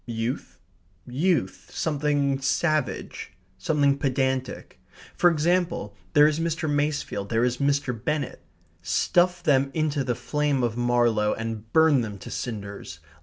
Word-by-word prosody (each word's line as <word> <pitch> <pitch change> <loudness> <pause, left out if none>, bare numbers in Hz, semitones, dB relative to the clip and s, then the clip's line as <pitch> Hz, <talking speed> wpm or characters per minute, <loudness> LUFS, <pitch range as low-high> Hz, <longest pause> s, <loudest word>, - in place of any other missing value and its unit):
Youth, 115 +2 -4 0.5
youth 160 +8 -1
something 145 -3 0
savage 155 +2 -1 0.3
something 140 +5 +2
pedantic. 130 -1 -2 0.3
For 175 - +5
example, 170 - 0 0.2
there 150 0 +7
is 155 +1 +2
Mr. 165 -1 -1
Masefield, 145 -9 -1
there 115 0 +1
is 125 0 0
Mr. 140 -2 +1
Bennett. 140 +4 -3 0.4
Stuff 180 0 +1
them 140 -4 +3
into 155 -3 0
the 125 -2 -1
flame 145 -2 -1
of 115 -2 0
Marlowe 120 -3 +2
and 115 -1 -6
burn 160 -4 +5
them 105 -3 -5
to - - -10
cinders. 100 -7 -6
140 Hz, 125 wpm, -25 LUFS, 120-150 Hz, 0.5 s, there